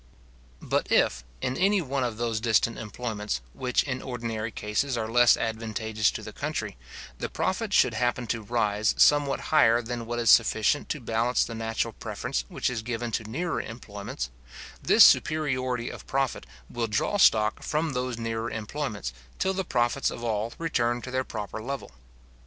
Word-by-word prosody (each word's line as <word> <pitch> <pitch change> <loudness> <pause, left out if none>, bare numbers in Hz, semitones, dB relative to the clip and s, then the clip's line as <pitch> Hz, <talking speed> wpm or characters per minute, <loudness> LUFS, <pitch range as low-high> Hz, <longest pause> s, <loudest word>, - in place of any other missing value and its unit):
But - - -1
if, 60 - +3 0.2
in 125 - 0
any 200 +2 +3
one 140 -5 -1
of 120 -3 -2
those 115 -2 -1
distant 115 0 +2
employments, 105 - -4
which 125 -1 0
in 130 -2 -3
ordinary 115 -3 -4
cases 105 +6 -1
are 110 -1 -2
less 120 +1 +5
advantageous 110 -1 -1
to - - -6
the - - -8
country, - - -3 0.4
the - - -3
profit - - -1
should - - +4
happen 120 0 0
to 115 0 -2
rise 105 -2 +1
somewhat 145 -2 +4
higher 120 -7 +6
than 120 -1 -5
what 120 0 -3
is 120 -1 +4
sufficient 115 +4 +3
to 150 - -2
balance 115 +1 +1
the 115 - -7
natural 115 0 -2
preference - - -4
which - - -2
is 125 -3 -1
given 120 0 -3
to 110 - -2
nearer 170 +8 -2
employments, 100 - -6 0.5
this - - +7
superiority 130 -6 +3
of - - -11
profit 135 -1 -1 0.2
will 120 -1 -2
draw 105 - 0
stock 110 - +4
from 155 -1 -1
those 125 -1 -2
nearer 115 0 -3
employments, 110 - -4 0.2
till 190 - +1
the 190 0 -1
profits 120 -3 +1
of 120 - -7
all 110 0 -1
return 120 -7 0
to 130 - -6
their 130 0 0
proper 110 -2 -6
level. 135 +4 -5
120 Hz, 170 wpm, -27 LUFS, 110-130 Hz, 0.5 s, this